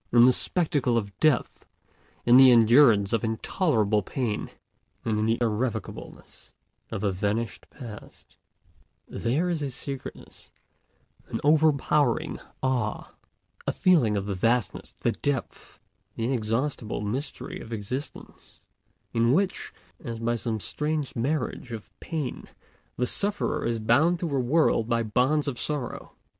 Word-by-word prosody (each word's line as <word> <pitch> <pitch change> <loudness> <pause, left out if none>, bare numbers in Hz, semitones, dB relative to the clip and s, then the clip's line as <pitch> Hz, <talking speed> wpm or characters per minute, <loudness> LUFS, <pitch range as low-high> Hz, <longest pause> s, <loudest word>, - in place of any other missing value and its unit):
In 120 0 +7
the 130 - +6
spectacle 145 -9 +1
of 100 -4 -3
Death, 155 -6 +1 0.6
in 120 +1 +7
the 130 0 +9
endurance 115 -3 +6
of 115 - +1
intolerable 110 - +1
pain, 110 +1 -3 0.6
and 110 -2 0
in 110 - +1
the 115 +1 +2
irrevocableness 115 -1 -4 0.4
of 100 - -4
a 100 - +2
vanished 105 +5 -2
past, 115 -7 -12 0.7
there 135 +10 -1
is 170 -3 -1
a 140 - -2
sacredness, 135 +1 -7 0.8
an - - -3
overpowering 150 -3 +2 0.2
awe, 125 -5 -1 0.5
a - - +3
feeling 145 - +3
of 100 - -2
the 100 - -2
vastness, 115 +2 -1
the - - +2
depth, 140 -4 -4 0.4
the 115 - -2
inexhaustible 115 -1 -1
mystery 125 +8 -4
of 115 - -10
existence, 120 +6 -7 0.5
in 115 +1 +3
which, 190 +4 0 0.3
as 115 -5 -5
by 115 +1 0
some 115 -1 -2
strange 150 +4 -2
marriage 130 0 -2
of 110 -3 -8
pain, 155 -6 -4 0.5
the 125 - +1
sufferer 205 +10 +1
is 115 -1 0
bound 125 +11 +3
to 170 - -3
the 140 -3 0
world 125 -3 +2
by 115 -1 +1
bonds 130 +7 +1
of 130 -4 -3
sorrow. 145 -5 -4
120 Hz, 130 wpm, -26 LUFS, 110-145 Hz, 0.8 s, the